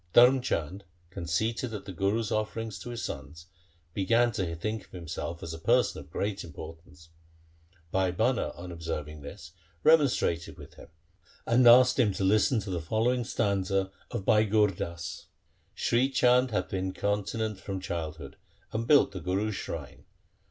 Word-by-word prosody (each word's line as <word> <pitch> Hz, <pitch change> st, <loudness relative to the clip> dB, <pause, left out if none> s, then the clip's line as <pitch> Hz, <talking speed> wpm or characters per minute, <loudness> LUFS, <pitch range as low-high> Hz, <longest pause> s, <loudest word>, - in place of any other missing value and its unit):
Dharm 125 Hz, +2 st, +7 dB
Chand, 95 Hz, -, -2 dB, 0.3 s
con 95 Hz, -3 st, -6 dB
ceited 110 Hz, +7 st, -1 dB
at 100 Hz, -1 st, -7 dB
the 100 Hz, -, -6 dB
Guru's 100 Hz, +5 st, 0 dB
offering 110 Hz, +1 st, -2 dB
to 105 Hz, -, -8 dB
his 120 Hz, -1 st, -5 dB
sons, 75 Hz, +4 st, -7 dB, 0.5 s
began 115 Hz, +6 st, +3 dB
to 90 Hz, -6 st, -2 dB
think 110 Hz, +5 st, -4 dB
himself 85 Hz, -1 st, -6 dB
a 80 Hz, 0 st, -5 dB
person -, -, +2 dB
of 70 Hz, -, -12 dB
great 100 Hz, +4 st, -3 dB
importance. 80 Hz, 0 st, -11 dB, 0.8 s
Bhai 95 Hz, -1 st, +2 dB
Bhana 115 Hz, +7 st, 0 dB
on 90 Hz, +1 st, -8 dB
observing 75 Hz, -3 st, -5 dB
this 70 Hz, +1 st, -10 dB, 0.3 s
remonstrated 140 Hz, -, +3 dB
with -, -, -12 dB
him, -, -, -13 dB, 0.6 s
and 120 Hz, +1 st, +4 dB
asked 125 Hz, +2 st, +7 dB
him 105 Hz, -6 st, +3 dB
to -, -, -2 dB
listen 110 Hz, +5 st, +3 dB
to 100 Hz, -, -6 dB
the 85 Hz, -2 st, -2 dB
following 115 Hz, +8 st, +1 dB
stanza 95 Hz, -3 st, 0 dB, 0.2 s
of 95 Hz, -, -4 dB
Bhai 110 Hz, 0 st, +4 dB
Gur 105 Hz, -1 st, +3 dB
Das: 85 Hz, -2 st, -6 dB, 0.2 s
— -, -, -40 dB
Sri 125 Hz, +3 st, +2 dB
Chand 125 Hz, -1 st, +4 dB
hath 105 Hz, -, -2 dB
been 95 Hz, -1 st, -2 dB
continent 105 Hz, +2 st, -2 dB
from 95 Hz, -1 st, -5 dB
childhood 80 Hz, -5 st, -5 dB, 0.4 s
and 115 Hz, +1 st, -2 dB
built 145 Hz, -7 st, +5 dB
the 95 Hz, -, -6 dB
Guru's 100 Hz, +5 st, -1 dB
shrine. -, -, -7 dB
100 Hz, 160 wpm, -29 LUFS, 85-115 Hz, 0.8 s, Dharm